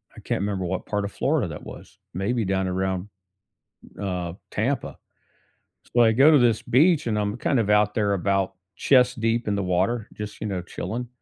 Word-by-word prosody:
I - - -11
can't - - -2
remember 100 -2 -2
what 90 +1 -3
part 105 -1 -2
of 100 - -5
Florida - - 0
that - - -8
was. - - -11 0.2
Maybe 105 +5 -1
down 95 0 0
around, 95 +1 -2 0.9
uh, 90 -3 -3 0.2
Tampa; - - -2 1.0
so, 120 - +6
I 115 - +6
go 135 +7 +6
to 150 - +6
this 115 -3 +3
beach, 155 +3 +3
and 110 -2 0
I'm 105 +1 -1
kind 125 +1 +1
of 105 - 0
out 105 0 +3
there 105 -2 +1
about 95 0 0 0.2
chest 125 +2 +3
deep 115 +1 0
in 105 - +1
the 100 - -1
water 95 +5 0
just, 105 -1 -8
you 110 - -2
know, 95 -3 -3
chilling 110 +7 -5
105 Hz, 195 wpm, -24 LUFS, 95-120 Hz, 1.0 s, so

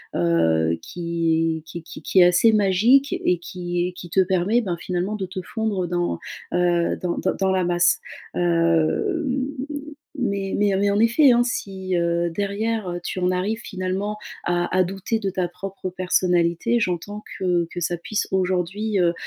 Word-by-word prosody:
heu, 80 -1 +2
qui 165 -2 -1
qui 170 +1 -7
qui - - -10
qui 190 - +2
est 180 - +8
assez 180 +6 +5
magique 215 +8 +4
et 180 - +1
qui 175 0 -3
et 180 - -6
qui 175 -1 -10
te 190 - +1
permet, 190 +5 +2
ben, 180 -5 -3
finalement, 180 +4 -2
de 195 -2 -3
te 185 0 -6
fondre 205 -4 -2
dans, 175 0 -1 0.3
heu, 175 -1 +2
dans, 175 -1 -2
heu, 185 - +2
dans 190 -1 +2
la 190 -1 +1
masse. 175 0 +3 0.4
Hem, 175 - +1 0.7
mais 200 -5 -1
mais 205 -1 +2
mais, 200 +1 +2
en 205 - +1
effet, 250 +5 +5
hein, 240 0 +4
si, 190 -6 -3
heu, 170 0 +1
derrière, 205 +3 -2
heu, 175 - -4
tu 185 - -4
en 180 0 +1
arrives, 205 +5 -1
finalement 190 +2 -3 0.3
à 175 +1 0
à 185 - +5
douter 195 +5 -2
de 195 -3 -1
ta 185 -1 -1
propre 185 +1 -6
personnalité, 180 +4 +1
j'entends 205 +4 -3 0.2
que 175 -2 +1
que 175 - -5
ça 175 +1 -1
puisse 205 +5 -2
aujourd'hui, 190 +3 0
heu, 170 -1 +3
185 Hz, 170 wpm, -23 LUFS, 175-205 Hz, 0.7 s, est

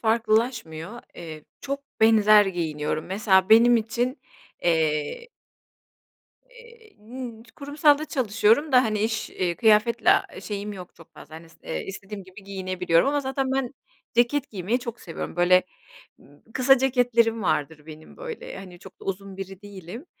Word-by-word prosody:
farklılaşmıyor. 220 -4 0
Eee, 155 -3 -9 0.2
çok 275 0 -4 0.2
benzer 215 -2 +6
giyiniyorum. 155 -4 -3
Mesela 190 -1 +2
benim 235 +2 +7
için, 240 +4 -2 0.4
eee. 160 - 0 1.2
Eee, 470 -2 -18
n 230 +1 -9
kurumsalda 290 +1 +2
çalışıyorum 245 +1 +1
da, 250 -1 +6
hani, 215 -1 -1
iş, 220 +1 -2
eee, 175 -2 -2
kıyafetle 220 +1 +3 0.3
şeyim 205 0 -5
yok 180 -3 -10
çok 165 - -18
fazla, 155 - -13
hani, 165 +1 -11
s 160 - -21
eee, - - -4
istediğim 195 +1 -8
gibi 190 +1 -15
giyinebiliyorum 185 0 0
ama 290 +1 +1
zaten 265 -1 -2
ben 270 -1 -2 0.4
ceket 255 +4 +1
giymeyi 205 +4 -1
çok 240 -2 -7
seviyorum. 165 0 -7
Böyle, 180 +1 +5 0.9
kısa 270 +1 +5
ceketlerim 245 -3 +2
vardır 155 -2 -2
benim, 155 0 -13
böyle, - - -8
hani, 180 -2 -11
çok 190 +1 -15
da - - -12
uzun 195 0 -5
biri 195 0 -8
değilim. 205 - -10
215 Hz, 140 wpm, -25 LUFS, 185-250 Hz, 1.2 s, benim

